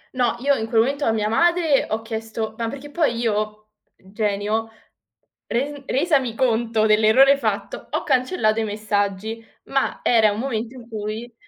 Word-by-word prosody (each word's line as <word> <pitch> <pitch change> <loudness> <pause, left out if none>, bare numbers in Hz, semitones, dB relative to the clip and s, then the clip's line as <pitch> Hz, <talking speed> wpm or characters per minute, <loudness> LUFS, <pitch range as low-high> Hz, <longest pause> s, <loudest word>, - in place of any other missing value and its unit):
No, 245 -2 +1
io 280 +1 +3
in 220 -4 -2
quel 225 -1 +3
momento 280 +4 0
a - - +3
mia 215 -1 0
madre 335 +4 +2
ho 220 +1 -2
chiesto 220 -1 -4
ma 230 -1 -1
perché 280 +2 -9
poi 305 -8 +1
io, 215 -2 -2 0.3
genio, 210 +2 -2 0.8
res 280 +4 -2
resami 270 -5 +1
conto 230 -3 +1
dell'errore 220 +6 +5
fatto, 220 -7 -3
ho - - -2
cancellato 250 -5 +1
i - - 0
messaggi, 210 +1 -2 0.2
ma 270 0 -1
era 220 -3 +4
un 205 - -4
momento 235 -1 -3
in 240 -2 -12
cui 220 +2 -5
225 Hz, 155 wpm, -22 LUFS, 215-260 Hz, 0.8 s, dell'errore